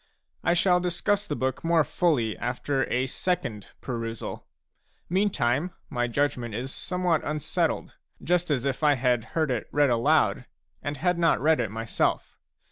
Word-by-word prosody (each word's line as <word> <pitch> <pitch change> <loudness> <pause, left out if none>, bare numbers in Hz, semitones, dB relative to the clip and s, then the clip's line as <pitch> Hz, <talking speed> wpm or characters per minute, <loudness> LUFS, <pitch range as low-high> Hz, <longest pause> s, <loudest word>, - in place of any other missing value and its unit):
I 175 - +3
shall 180 0 +4
discuss 200 +4 0
the 150 - -2
book 130 -1 -2
more 165 -1 +4
fully 145 -7 +1
after 135 +3 -1
a 125 +1 +1
second 120 - -2
perusal; 115 -2 -5 0.6
meantime, 175 - +1 0.2
my 120 -3 0
judgment 120 -3 -1
is 130 +4 -4
somewhat 180 -4 0
unsettled, 150 -1 -1 0.3
just 175 0 +1
as 140 -3 0
if 135 +1 -1
I 150 -2 +5
had 125 -2 +1
heard 155 -4 +2
it 120 -3 -2
read 145 -3 +3
aloud, 125 +1 +2 0.3
and 145 0 -4
had 180 +4 +1
not 165 -1 +3
read 155 0 +3
it 115 -4 0
myself. 110 +2 -1
145 Hz, 150 wpm, -27 LUFS, 120-170 Hz, 0.6 s, I